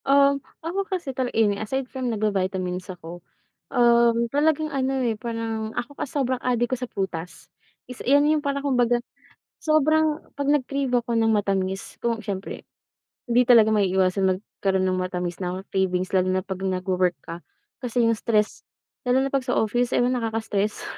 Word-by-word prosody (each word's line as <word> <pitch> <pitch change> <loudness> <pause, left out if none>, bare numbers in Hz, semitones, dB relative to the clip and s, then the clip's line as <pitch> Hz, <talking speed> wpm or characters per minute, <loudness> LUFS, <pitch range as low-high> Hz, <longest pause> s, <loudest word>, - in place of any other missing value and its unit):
Uhm, 280 0 +4 0.2
ako 365 +4 -1
kasi 340 -8 -3
talaga 255 -2 -2
any, 205 -2 +2
aside 265 +5 -2
from 255 0 -4
nagba-vitamins 190 -4 -1
ako, 175 -1 -8 0.5
uhm 235 -2 +4
talagang 310 +1 +1
ano 270 0 0
eh 230 - +1
parang 225 -1 -4
ako 275 +4 -3
kasi 280 - -5
sobrang 255 -2 0
adik 240 0 0
ko - - +3
sa 250 - -4
prutas. 180 -3 -5 0.4
Is 250 - -10
'yan 285 +3 +4
yung 305 0 +3
parang 280 -1 -2
kumbaga, 245 -3 +3 0.7
sobrang 310 0 +3 0.2
'pag 285 0 0
nag-crave 275 -2 0
ako 240 -1 +1
ng 225 -1 +3
matamis 195 -2 -1
ku 230 -1 0
syempre, 200 -3 -6 0.6
hindi 240 0 +3
talaga 225 -3 +7
maiiwasan 190 -2 +2
magkaro'n 190 -1 -2
ng 185 0 +1
matamis 180 -1 -3
na 185 0 -3
cravings 185 -1 0
lalo 185 -1 +2
na 185 0 0
'pag 190 -1 -5
nagwo-work 185 -1 0
ka, 170 +1 -7 0.4
kasi 245 -1 0
yung 230 0 +3
stress 215 -2 0 0.4
lalo 255 +2 +3
na 275 - -2
'pag 270 -1 -1
sa 250 - +1
office 240 +3 +1
ewan 245 +1 +3
nakaka-stress 220 -3 -2
230 Hz, 165 wpm, -24 LUFS, 190-260 Hz, 0.7 s, talaga